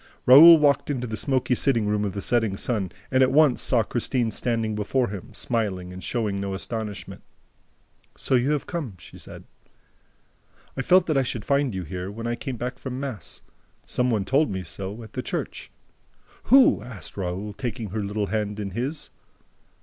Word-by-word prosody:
Raoul 160 +6 +10
walked 145 -2 +2
into 130 -4 -2
the 110 -2 -4
smoky 130 +2 0
sitting 120 -3 +1
room 105 0 0
of 100 - -3
the 100 - -4
Setting 115 -5 +1
Sun 105 -7 -2 0.2
and 130 0 +3
at 130 - +5
once 145 -2 +4
saw 120 -3 +2
Christine 120 +1 -1
standing 115 -2 -1
before 105 +4 0
him, 100 -3 -8
smiling 95 -6 -2
and 95 - -9
showing 105 -5 -2
no 100 -1 -3
astonishment. 105 0 -6 1.0
"So - - -2
you 125 +2 +3
have 150 -3 0
come," 150 - -5
she 75 - -13
said. - - -11 1.3
"I 135 - -2
felt 180 +6 +4
that 155 -4 0
I - - +4
should 120 -4 -4
find 140 -5 +1
you 95 - -3
here, 90 +3 -5
when 115 +3 -7
I 120 - -1
came 125 +1 -5
back 125 +3 -5
from 130 -1 -5
mass. 120 -11 -6 0.4
Some 125 0 0
one 105 -5 0
told 135 +6 +2
me 95 -2 -4
so, 100 +5 -7
at 110 - -13
the - - -3
church." - - -5 0.8
"Who?" 260 - +6
asked 115 -3 -9
Raoul, 95 +2 -4
taking 115 -2 -5
her 105 +1 -2
little 105 +1 -2
hand 105 +1 -2
in 100 -2 -4
his. 130 - -4
115 Hz, 185 wpm, -24 LUFS, 100-130 Hz, 1.3 s, Raoul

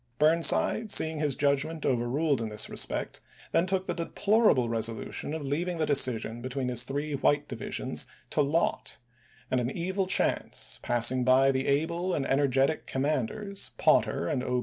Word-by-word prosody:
Burnside 165 - +3
seeing 160 -5 +2
his 145 -3 +1
judgment 145 +3 0
overruled 130 +3 0
in 110 - -3
this 105 0 -2
respect - - -3 0.3
then 170 - +2
took 190 0 0
the - - -2
deplorable 200 - +2
reso 115 -1 +1
lution 150 - -5
of 155 -3 -5
leaving 170 +6 -2
the 160 - 0
decision 120 -5 +1
between 130 +1 -3
his 120 -1 +3
three 145 +3 -4
white 145 +1 +1
divisions 115 -3 -4 0.2
to - - +2
lot; 150 +4 0 0.5
and 130 - +2
an 120 - -2
evil 185 +5 -2
chance, 190 - 0
passing 120 +1 +2
by 130 +2 +4
the 130 0 -2
able 170 +6 0
and 135 - -2
energetic 135 +2 +1
commanders, 150 - -2
Potter 85 - +2
and 125 - -1
0. 125 0 -1
140 Hz, 160 wpm, -28 LUFS, 125-165 Hz, 0.5 s, by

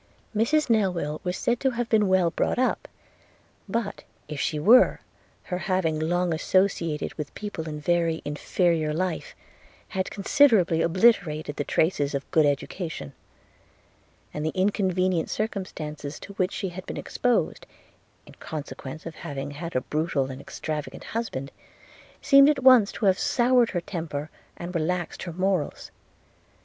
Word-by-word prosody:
'Mrs 300 +9 +2
Newill 180 - 0
was 180 0 -2
said 240 0 0
to 270 - +2
have 240 -1 -2
been 215 -3 +3
well 185 -3 +3
brought - - 0
up; 255 +1 0 0.8
but, 225 -3 -3 0.2
if 150 -2 -4
she 155 - -1
were, 230 +12 +6 0.4
her 180 -1 -4
having 185 -5 0
long 175 +2 +1
associated 170 -2 0
with 150 - -4
people 185 -6 -5
in 150 -1 -5
very 165 +1 0
inferior 155 +1 0
life 185 0 -3 0.5
had 190 -1 -2
considerably 200 - +3
obliterated 170 -5 +2
the 145 - -2
traces 145 -2 +1
of 140 - -2
a - - -37
good 155 -2 +4
education: 145 - -3 1.2
and 150 - -4
the 155 - 0
inconvenient 185 -3 +1
circumstances 155 -9 -4
to 200 - -10
which 185 0 0
she 195 - -3
had 180 +1 -8
been - - -5
exposed, 245 -1 -1 0.6
in - - -15
consequence 150 -1 -7
of 165 - -6
having 140 -2 -6
had 165 +4 -7
a 130 - +2
brutal 150 -3 -1
and 130 +1 -8
extravagant 150 0 -5
husband, 180 - -4 0.7
seemed 275 +1 +7
at 280 -3 0
once 250 -6 +7
to 215 - -3
have 190 -1 +4
soured 245 -1 +3
her 175 - -2
temper, 160 -4 -5 0.3
and 175 +1 -6
relaxed 175 +1 -2
her 175 - -5
morals. 185 -2 -1
175 Hz, 145 wpm, -26 LUFS, 155-200 Hz, 1.2 s, seemed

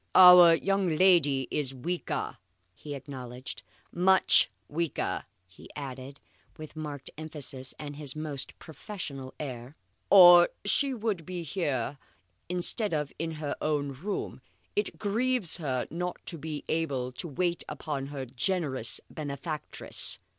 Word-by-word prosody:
"Our 180 -2 +10
young 195 -2 0
lady 155 -8 +4
is 135 -3 -1
weaker," 170 +7 -3 0.4
he 145 +9 -8
acknowledged. 130 -2 -8 0.3
"Much 190 +2 +5 0.2
weaker," 165 +1 -2 0.2
he 90 +1 -16
added 135 -1 -7 0.4
with 155 0 -10
marked 150 -3 -5
emphasis 145 -4 -5
and 145 -1 -7
his 145 -2 -4
most 150 -3 -5
professional 145 -6 -8
air, 130 -1 -6 0.3
"or 175 -3 +9 0.2
she 275 +7 +3
would 215 -7 -2
be 180 0 -5
here 145 -6 -2 0.5
instead 180 +2 +2
of 150 -2 -3
in 165 0 -2
her 150 -2 -4
own 145 -2 0
room. 180 +10 -5 0.3
It 415 - 0
grieves 225 -1 0
her 130 -6 -2
not 180 +2 -3
to 170 - -5
be 150 0 -5
able 140 -6 -1
to 125 +7 -6
wait 175 +3 -1
upon 145 -2 -4
her 140 -2 -5
generous 130 -1 -1
benefactress." 150 +1 -4
155 Hz, 125 wpm, -29 LUFS, 135-180 Hz, 0.5 s, Our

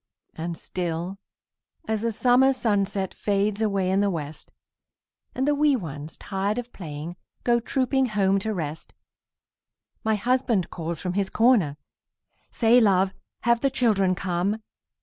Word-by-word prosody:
And 165 +1 -4
still, 175 +2 -4 0.7
as 220 -1 -1
the 230 0 0
summer 250 +4 +4
sunset 200 -5 0
Fades 205 +1 0
away 195 -4 +1
in 195 +1 +3
the 205 - +2
west, 155 -4 -6 0.8
And 265 +2 0
the 295 - +4
wee 290 -1 +3
ones, 155 - -6
tired 200 +3 -2
of 245 0 -5
playing, 160 0 -7 0.3
Go 240 -1 +3
trooping 260 +2 +1
home 195 -3 +2
to 220 +3 -2
rest, 160 -5 -5 1.1
My 220 0 +2
husband 235 -3 +1
calls 165 -1 -4
from 180 -1 -3
his 195 0 0
corner, 215 - +3 0.7
"Say, 235 +1 +4
love, 195 -4 +3 0.3
have 235 0 +3
the 275 - +2
children 210 -8 +2
come?" 195 +4 -1
200 Hz, 140 wpm, -25 LUFS, 180-235 Hz, 1.1 s, summer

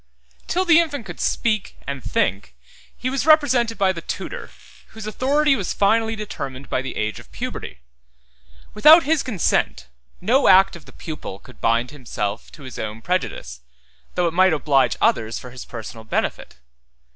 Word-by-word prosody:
Till 365 +2 0
the 335 -2 +6
infant 290 -8 -1
could 175 -3 -9
speak, 215 -4 -1
and 140 -2 -5
think, 95 - -1 0.4
he 250 - -3
was 270 +2 -1
represented 260 -7 +4
by 195 -1 +3
the 165 - -7
tutor, - - -6 0.4
whose 220 -1 -10
authority 275 +6 +2
was 195 -7 -2
finally 225 +2 +2
determined 140 -11 -7
by 130 - +1
the 135 - -6
age 110 0 -2
of - - -16
puberty. - - -6 0.9
Without 310 +10 +8
his 310 0 +2
consent, 180 - 0 0.3
no 245 +9 +3
act 190 0 +6
of 170 - -12
the - - -14
pupil 155 - -7
could - - -17
bind 115 +2 +1
himself 115 -7 -5
to 150 - -13
his 130 -1 -8
own 110 +1 -5
prejudice, 65 - -3 0.5
though 180 - +2
it 165 - 0
might 185 0 +4
oblige 145 -3 +2
others 110 0 +1
for 125 - -9
his 125 0 -9
personal 110 -1 -8
benefit. 110 - -3
180 Hz, 165 wpm, -22 LUFS, -, 0.9 s, Without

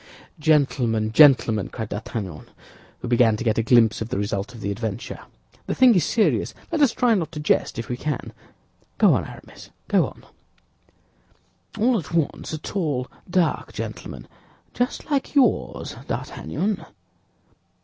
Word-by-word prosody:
"Gentlemen, 130 -8 +2
gentlemen," 120 -7 +5
cried 110 -3 -6
D'Artagnan, 100 -6 -6 0.5
who - - -3
began 115 -2 +4
to - - -4
get 115 -2 +1
a - - +4
glimpse 115 -2 +4
of 110 - -3
the 130 - -2
result 100 +2 -2
of - - -10
the 100 - -2
adventure, 105 -1 -5 0.5
"the - - -1
thing 255 -2 +6
is 180 -7 +3
serious. 220 +6 +1 0.2
Let 325 -2 0
us 280 -5 +5
try 245 0 +2
not 170 -7 -1
to 150 - -5
jest, 150 - +1
if 115 - -4
we 125 - -3
can. 150 0 -4 0.6
Go - - +5
on - - 0
Aramis, - - -13 0.2
go - - +3
on." - - -14 1.5
"All 235 +1 +3
at 160 - -9
once, 165 -3 -1
a 155 - -3
tall, 150 -7 -3 0.2
dark 175 -3 0
gentleman—just 250 +4 -6
like 280 +1 -1
yours, 215 - +1
D'Artagnan." 190 - -3
130 Hz, 150 wpm, -23 LUFS, 110-185 Hz, 1.5 s, thing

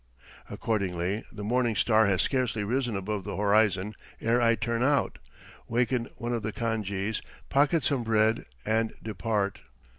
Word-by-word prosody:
Accordingly, 100 -2 -1
the 105 -2 -7
morning 120 +1 +1
star 110 0 +4
has 95 -1 +2
scarcely 125 -5 0
risen 120 0 0
above 100 +1 -3
the - - -5
horizon 105 -1 +2 0.3
ere 120 +2 +2
I 115 0 +4
turn 115 +2 -1
out, 140 +2 +2 0.5
waken 120 0 +1
one 120 +1 -3
of 115 - -1
the 110 +1 -3
khan 115 0 -1
jees, 100 +1 -2 0.3
pocket 145 +3 +3
some 140 -4 +1
bread 110 -1 +2 0.2
and 110 +1 +1
depart. 105 -1 -1
110 Hz, 150 wpm, -28 LUFS, 105-120 Hz, 0.5 s, star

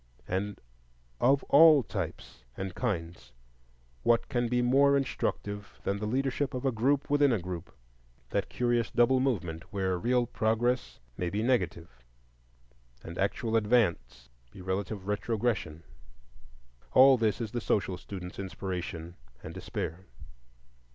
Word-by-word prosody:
And 100 +2 -2 0.6
of 135 +2 +3
all 155 -2 +7
types - - -6
and 95 -1 -4
kinds, 85 - -4 0.7
what 115 0 +2
can 120 -1 0
be 125 +1 +1
more 140 +3 +5
instructive 105 -6 -3
than 100 +1 -1
the 105 - -3
leadership 135 +3 -1
of 125 - -4
a 135 - +3
group 135 +5 +1
within 145 -1 +4
a 115 - +2
group?—that - - -7
curious 120 -3 0
double 125 +2 +3
movement 95 -8 -2
where 95 -3 -1
real 120 +3 +2
progress 120 +2 0 0.2
may 90 - -1
be 105 +4 -2
negative 90 - -1 1.0
and 85 +1 -8
actual 110 +3 0
advance 95 - +1 0.2
be - - -14
relative 95 +2 -3
retrogression. 105 -6 -1 1.1
All 135 +1 +8
this 110 -2 0
is 115 -3 -4
the 120 - -3
social 95 -4 0
student's 90 0 -8
inspiration 90 -3 -5 0.3
and - - -7
despair. 90 +5 -5
105 Hz, 125 wpm, -29 LUFS, 90-125 Hz, 1.1 s, All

